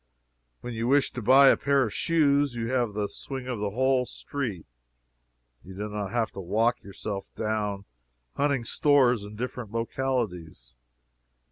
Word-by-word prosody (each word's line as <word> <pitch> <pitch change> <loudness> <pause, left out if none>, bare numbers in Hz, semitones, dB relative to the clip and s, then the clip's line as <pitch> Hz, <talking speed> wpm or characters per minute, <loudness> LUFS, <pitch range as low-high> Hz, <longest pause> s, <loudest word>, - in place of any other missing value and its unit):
When 120 - -6
you 115 +1 -2
wish 140 +2 +3
to 125 - -6
buy 135 +5 +7
a - - +6
pair 140 -1 +2
of 110 - -3
shoes 145 -5 +2
you 115 +1 -3
have 120 -5 0
the 105 -1 -1
swing 130 +4 -7
of 125 -4 -3
the 105 0 -1
whole 130 +3 +1
street 120 - -5 1.0
you 95 +1 -11
do 105 +2 -4
not 105 -1 -4
have 115 -2 -1
to - - -9
walk 110 +6 +1
yourself 100 0 -6
down 105 -2 -2 0.5
hunting 140 -4 0
stores 130 -6 +3
in 105 +1 -9
different 120 -1 -5
localities. 115 - -3
115 Hz, 155 wpm, -27 LUFS, 105-130 Hz, 1.0 s, buy